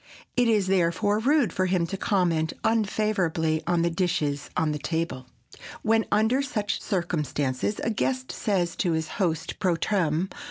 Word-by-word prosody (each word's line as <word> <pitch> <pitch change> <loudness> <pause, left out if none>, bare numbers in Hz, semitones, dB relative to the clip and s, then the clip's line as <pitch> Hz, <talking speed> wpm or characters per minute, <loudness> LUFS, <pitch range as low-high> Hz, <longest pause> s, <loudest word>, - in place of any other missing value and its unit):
It 245 -1 +3
is 215 -4 +3
therefore 190 +3 +2
rude 255 - +2
for 185 0 +1
him 180 -2 +1
to 185 +4 -4
comment 175 -5 +1
unfavorably 195 -8 +1
on 175 -1 +2
the 170 - +1
dishes 165 -5 -1
on 160 -1 +2
the 150 - -3
table. 155 -5 -3 0.6
When, 225 0 +3
under 220 +6 +3
such 215 -7 -2
circumstances, 155 - -1
a 225 - +1
guest 255 +4 -1
says 185 -5 -1
to 175 -4 +1
his 160 0 -1
host 165 -5 -2
_pro 180 -3 +1
tem. 180 -3 0
180 Hz, 155 wpm, -26 LUFS, 160-215 Hz, 0.6 s, It